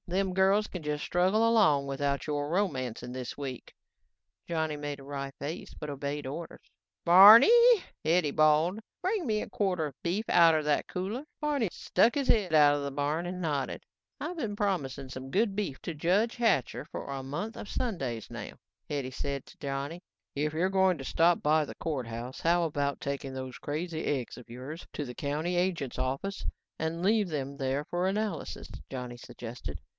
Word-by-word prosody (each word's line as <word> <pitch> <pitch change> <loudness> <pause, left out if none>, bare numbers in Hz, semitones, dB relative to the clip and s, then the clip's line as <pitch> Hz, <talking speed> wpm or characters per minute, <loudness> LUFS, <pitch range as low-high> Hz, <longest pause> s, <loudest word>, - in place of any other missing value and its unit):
Them 185 +1 0
girls 195 +3 +3
can 180 -4 -7
just 150 0 -2
struggle 190 +6 +3
along 190 -12 +4
without 140 0 -1
your 145 -1 -1
romancing 130 - -1
this 125 -2 -5
week." 135 -3 -6 0.7
Johnny 160 -2 -1
made 145 -1 -5
a - - -11
wry 140 0 -5
face 150 +4 -5
but 150 - -6
obeyed 140 +1 -4
orders. 150 +6 -7 0.4
"Barneeey," 295 - +9 0.2
Hetty 160 -1 +2
bawled, 155 +6 +3 0.2
"bring 380 -1 0
me 215 -3 0
a - - -6
quarter 185 -6 0
of 145 -4 -8
beef 190 +6 -1
outta 165 -2 +5
the 150 0 +2
cooler." 200 +9 -3 0.2
Barney 290 - 0
stuck 230 +8 +2
his 280 -2 0
head 200 -7 +3
out 145 -2 +6
of 145 - -2
the 140 - -3
barn 145 +4 -1
and 180 +1 -4
nodded. 145 -6 -2 0.4
"I - - -3
been 230 -12 -3
promising 145 -10 -1
some 130 0 -7
good 200 +4 +1
beef 195 -11 -2
to 170 - -3
Judge 185 +9 +1
Hatcher 225 - +1
for 150 - -7
a 135 -1 -5
month 150 - -4
of - - -8
Sundays 135 - -3
now," - - -7 0.4
Hetty 140 -3 -2
said 140 +1 -4
to - - -16
Johnny. 140 +4 -4 0.3
"If 150 +2 0
you're 170 +5 +1
going 190 -2 +3
to 135 - -7
stop 170 +5 +3
by 155 +1 +3
the 145 - -8
courthouse, 125 -5 -4
how 170 +1 +3
about 145 -3 -1
taking 140 -1 -4
those 130 -1 -6
crazy 160 +2 -3
eggs 130 -5 -2
of 125 -1 -13
yours 130 +8 -8
into 150 - -4
the 125 -1 -8
county 155 +5 -2
agent's 175 -8 -1
office 135 +10 -2 0.3
and 160 +2 -2
leave 210 -1 +3
them 140 -3 -3
there 135 +1 -1
for 175 +3 -1
analysis," 210 +2 -3 0.2
Johnny 125 -2 -5
suggested. 120 0 -8
155 Hz, 180 wpm, -30 LUFS, 140-190 Hz, 0.7 s, Barneeey